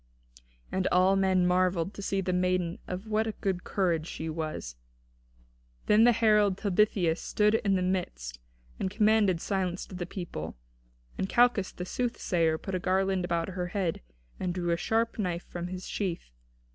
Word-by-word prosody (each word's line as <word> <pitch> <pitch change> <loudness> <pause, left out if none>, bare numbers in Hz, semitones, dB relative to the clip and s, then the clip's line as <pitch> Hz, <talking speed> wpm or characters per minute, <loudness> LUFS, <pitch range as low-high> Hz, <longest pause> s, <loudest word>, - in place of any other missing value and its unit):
And 190 0 0
all 185 +2 +4
men 190 -2 +3
marvelled 180 0 +1
to - - -8
see 195 0 -1
the 185 -1 -1
maiden 180 -1 0
of 185 +3 -5
what 220 0 0
a 220 - -2
good 190 -3 -2
courage 170 -5 0
she 160 -2 -5
was. 155 - -4 1.1
Then 215 +2 +5
the 240 - +7
herald 210 -4 +3
Talthybius 195 -4 +2
stood 210 0 +2
in 200 -3 +2
the 185 - +1
midst - - -3 0.4
and 190 - -1
commanded 210 -3 +3
silence 185 -1 -2
to - - -13
the 180 -1 -4
people; 80 - -6 0.6
and 190 - -1
Calchas 240 -5 +3
the 180 - -6
soothsayer 175 -8 0
put 195 - -7
a 185 - 0
garland 190 0 +1
about 170 -1 -1
her 180 -1 -3
head, 175 -2 -2 0.4
and 180 -1 -2
drew 175 -2 -1
a - - +3
sharp 225 +6 0
knife 180 -3 -1
from 175 0 -5
his 185 +1 -6
sheath. 175 - -3
185 Hz, 170 wpm, -29 LUFS, 175-200 Hz, 1.1 s, the